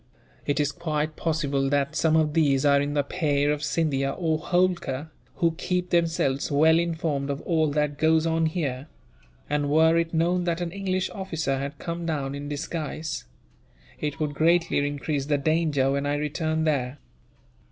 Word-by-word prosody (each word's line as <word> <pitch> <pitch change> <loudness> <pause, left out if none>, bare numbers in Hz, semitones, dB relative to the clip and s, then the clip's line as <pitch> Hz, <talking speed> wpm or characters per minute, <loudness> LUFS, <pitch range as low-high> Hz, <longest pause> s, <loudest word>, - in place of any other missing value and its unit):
It 145 0 +1
is 145 -1 +1
quite 155 0 -2
possible 140 -4 0
that 140 +1 0
some 160 -1 +2
of 155 -2 +2
these 145 -4 +3
are 140 -1 +5
in 145 +1 -2
the 145 - +2
pay 145 -2 0
of 150 0 +1
Scindia, 140 -4 0
or 160 -3 0
Holkar, 170 -5 0 0.2
who 170 -2 +2
keep 180 0 -1
themselves 165 -6 +1
well 160 +3 +5
informed 160 -5 -1
of 140 0 -2
all 160 -3 +1
that 150 -1 0
goes 160 0 +3
on 165 0 +2
here; 145 -5 -3 0.6
and 145 -1 0
were 160 +2 +4
it 165 0 -1
known 175 +2 +1
that 170 -1 0
an 175 -1 -3
English 190 -1 -2
officer 160 -8 -2
had 140 +1 -5
come 170 +1 -5
down 140 -4 -2
in 145 +1 -6
disguise, 155 +1 -4 0.7
it 150 -2 -3
would 150 -2 -1
greatly 165 +3 +2
increase 145 0 -2
the 145 -1 +2
danger 150 -2 +1
when 140 +1 -1
I 145 - +1
return 155 +2 -1
there." 140 -4 0
155 Hz, 170 wpm, -25 LUFS, 145-165 Hz, 0.7 s, are